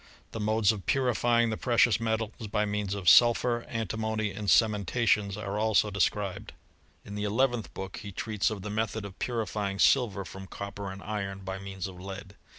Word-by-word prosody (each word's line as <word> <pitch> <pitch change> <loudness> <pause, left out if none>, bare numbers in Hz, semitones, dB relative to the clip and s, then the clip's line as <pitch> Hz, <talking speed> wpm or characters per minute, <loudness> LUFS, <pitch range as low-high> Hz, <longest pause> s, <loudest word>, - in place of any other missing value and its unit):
The 115 - -5
modes 110 -1 +3
of 105 -3 -7
purifying 120 -3 +2
the 110 - -2
precious 120 -2 +3
me 110 -1 +1
tals 110 -1 -6
by 105 +1 +1
means 105 -1 -2
of 95 -3 -6
sulphur, 120 +1 +5
antimony, 110 -2 -2
and 105 +2 -6
cemeutatiou^) 105 -2 +3
222 125 - -3
HISTOEY 105 -3 +3
OF 100 - -6
CHEMISTEY. 105 - -7
are 100 0 -3
also 110 -1 +2
described. 100 0 -1 0.5
In 100 - -8
the 105 0 -3
eleventh 120 +2 0
book 95 -1 -6
he 105 -4 -7
treats 105 +1 -1
of 105 -3 -6
the 105 - -4
method 110 0 -2
of 95 -2 -10
puiifying 105 -4 -2
silver 105 -8 +3
from 95 +1 -9
copper 100 +1 -6
and 95 +1 -9
iron, 100 -2 -4
by 95 0 -5
means 95 -2 -6
of 95 -2 -8
lead. 100 +1 -8
105 Hz, 200 wpm, -29 LUFS, 100-110 Hz, 0.5 s, sulphur